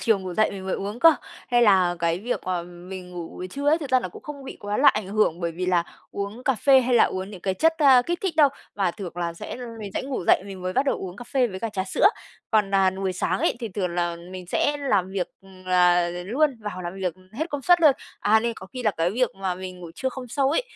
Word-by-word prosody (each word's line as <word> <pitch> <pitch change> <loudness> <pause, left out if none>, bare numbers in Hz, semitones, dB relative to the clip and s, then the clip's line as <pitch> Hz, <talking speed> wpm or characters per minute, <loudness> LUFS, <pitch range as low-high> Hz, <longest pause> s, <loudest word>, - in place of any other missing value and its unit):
chiều 225 -4 +3
ngủ 185 -2 -6
dậy 215 - +3
mình 190 -1 -7
mới 190 - 0
uống 205 +4 -5
cơ. 330 -1 +8 0.3
Hay 240 0 +4
là 185 -5 +4
cái 170 0 0
việc 235 +6 -2
mà 180 -2 -1
mình 180 +1 -9
ngủ 175 -2 -6
buổi 185 - -7
trưa 280 +8 -2
ấy, 315 +2 +4
thực 290 -5 -6
ra 255 0 +4
là 185 - -4
cũng - - -13
không 285 -2 -8
bị - - -8
quá 205 0 -2
là 280 - +6
ảnh 210 -2 +1
hưởng 200 -5 +1
bởi 170 -1 -2
vì 180 +2 -4
là 180 -2 +3 0.3
uống 200 +5 -5
cà 270 - +3
phê 265 +4 +5
hay 250 0 +1
là 235 - +7
uống 190 +1 -3
những 195 -4 -10
cái 190 +1 -1
chất, 325 +9 +3
a, 270 -5 +7
kích 345 +6 -2
thích 370 -5 -1
đâu. 300 -3 +7 0.3
Mà 195 -3 +1
thường 185 -1 -7
là 170 -1 -2
sẽ - - -7 0.2
mình 205 -2 -6
sẽ - - -1
ngủ 265 -8 -4
dậy - - +5
mình 190 -2 -8
mới 185 0 -2
bắt 265 +7 +1
đầu - - +1
uống 185 -1 -7
cà 245 - -9
phê 255 +1 +1
với 190 -4 -7
cả 230 - -2
trà 195 -3 -3
sữa. 190 - +3 0.4
Còn, 210 -3 +2
à, 190 -1 +4
buổi 190 0 -3
sáng 185 0 -1
ấy - - +1
thì 230 - -3
thường 185 -2 -2
là 175 -1 -1
mình 185 -1 -8
sẽ 290 +11 +1
làm 205 -10 0
việc, 190 -2 -2 0.4
ờ, 180 -1 +4
luôn, 235 - 0
vào 205 -4 -5
làm 175 +1 -5
việc 185 -3 -2 0.2
hết 315 +9 -3
công 290 -1 -3
suất 350 +4 +5
luôn. 305 -4 +7 0.3
À, 220 +2 +4
nên 235 +1 -1
có 190 - -10
khi 250 +6 -7
là 215 - +3
cái 170 -2 0
việc 245 +4 +1
mà 190 -2 -2
mình 185 0 -8
ngủ 170 -2 -8
trưa 260 - -2
không 255 -1 -8
sâu 270 +3 +1
ấy, 325 - +2
200 Hz, 280 wpm, -24 LUFS, 180-255 Hz, 0.4 s, cơ